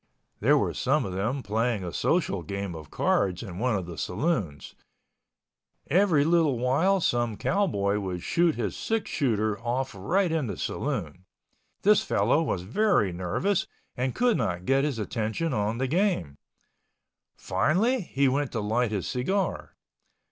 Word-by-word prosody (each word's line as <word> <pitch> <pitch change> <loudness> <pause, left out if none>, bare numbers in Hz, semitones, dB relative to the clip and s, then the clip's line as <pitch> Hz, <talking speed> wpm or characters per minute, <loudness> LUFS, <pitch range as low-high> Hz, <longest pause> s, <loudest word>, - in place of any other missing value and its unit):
There - - +4
were - - 0
some - - +1
of 95 - -5
them 115 +8 -2
playing 110 0 0
a 85 - -5
social 155 - 0
game 100 +2 -4
of 80 -3 -9
cards 95 -1 0
in 90 -4 -7
one 125 -1 +1
of 95 -3 -2
the 85 -2 -8
saloons. 95 - -2 1.2
Every 170 -4 +4
little 160 -5 +3
while 145 +11 +2
some 120 - 0
cowboy 105 - +1
would 90 -3 -4
shoot 170 -2 +2
his 105 -6 -3
six 225 -1 -2
shooter 110 -6 0
off 125 +3 -2
right 175 - 0
in 160 -5 0
the 100 - -5
saloon. 90 - -3 0.6
This 210 +1 +5
fellow 160 - +2
was 95 - -2
very 125 - +2
nervous 95 - -1 0.3
and 125 0 -2
could 245 -2 +2
not 90 0 -2
get 135 +1 +3
his 145 -5 -2
attention 110 +8 -2
on 105 0 0
the 130 - 0
game. 150 - 0 1.0
Finally 195 - +1
he 140 -6 +1
went 140 +1 0
to 115 - -1
light 110 +3 0
his 100 -4 -2
cigar. 185 +9 -2
120 Hz, 155 wpm, -27 LUFS, 100-165 Hz, 1.2 s, This